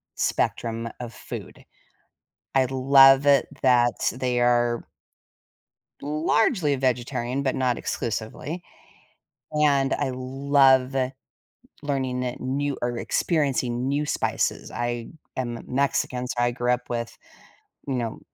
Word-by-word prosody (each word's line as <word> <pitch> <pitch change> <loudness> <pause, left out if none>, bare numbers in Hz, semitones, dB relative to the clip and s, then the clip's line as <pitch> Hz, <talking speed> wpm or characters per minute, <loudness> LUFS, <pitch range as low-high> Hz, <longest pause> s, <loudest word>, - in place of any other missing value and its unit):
spectrum 115 0 -1
of 120 -2 -7
food. - - -9 0.9
I 135 - +5
love 135 +1 +6
it 140 -2 +5 0.2
that 120 -2 +3
they 125 -1 0
are 120 -1 +2 1.2
largely 155 - +1
vegetarian, 125 0 -1
but 130 - 0
not 130 -2 0
exclusively; 120 +9 -4 0.9
and 145 -3 +2
I 130 - -1
love 135 0 +3 0.9
learning 130 -3 -1
that 125 -1 -4
new, 140 +2 -2
or 120 0 -1
experiencing 130 -5 0
new 145 +2 0
spices, - - -1
I 120 -1 -3 0.3
am 120 -3 -3
Mexican, 125 -2 0
so 125 - -4
I 120 0 +2
grew 120 0 0
up 125 0 -2
with, 115 -1 -4 0.7
you 135 - -1
know, 115 -3 -3
130 Hz, 110 wpm, -25 LUFS, 120-140 Hz, 1.2 s, love